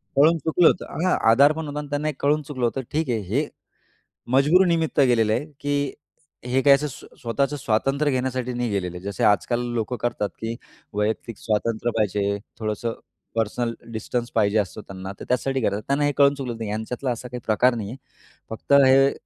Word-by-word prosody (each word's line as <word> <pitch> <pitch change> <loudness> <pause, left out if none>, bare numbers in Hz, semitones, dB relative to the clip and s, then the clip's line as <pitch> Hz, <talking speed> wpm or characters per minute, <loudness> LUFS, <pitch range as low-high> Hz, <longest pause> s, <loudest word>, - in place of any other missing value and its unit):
कळून 155 +5 +5
चुकलं 160 +2 +3
होतं, - - +2 0.2
हा 185 - +3 0.2
आधार 140 +6 +6
पण 160 0 -5
होता 145 0 -4
आणि 150 - -6
त्यांना 145 +1 -1
हे 155 - 0
कळून 150 +2 +2
चुकलं 135 -4 -3
होतं, 125 +3 -1
ठीक 155 -2 -1
आहे 115 - +1
हे 120 +11 -1 0.9
मजबुरीनिमित्त 165 +4 +3
गेलेलं 120 -5 +4
आहे, 145 - -1
की 145 -1 -1 0.5
हे 130 +2 +1
काय 140 0 +7
असं 150 +2 +2 0.3
स्वतःचं 135 +5 0
स्वातंत्र्य 135 +4 +1
घेण्यासाठी 130 -1 -1
नाही 120 -1 -1
गेलेलं 90 -4 -2
आहे. 90 - -11
जसे 100 -3 -3
आजकाल 120 +4 +3
लोकं 120 +2 -2
करतात, 120 -4 -1
की 115 +1 -3 0.4
वैयक्तिक 105 +2 -2
स्वातंत्र्य 115 +2 -1
पाहिजे, 100 -1 +1 0.2
थोडंसं 110 +1 -2 0.4
पर्सनल 115 +1 -1 0.2
डिस्टन्स 120 +2 -3
पाहिजे 105 -1 +3
असतो 105 +2 -3
त्यांना, 95 -1 -8
तर - - -8
त्यासाठी 135 +1 0
करतात 105 -2 0
त्यांना 140 +1 +2
हे 145 - +2
कळून 140 -1 +6
चुकलं, 125 -4 -5
नाही 110 -2 -4
यांच्यातला 115 +5 -3
असा 120 +1 -5
काही 125 0 -7
प्रकार 120 +3 +3
नाही 105 -3 -4
आहे 125 - -7 0.5
फक्त 110 +5 -2
हे 135 +1 +6
125 Hz, 185 wpm, -24 LUFS, 110-140 Hz, 0.9 s, काय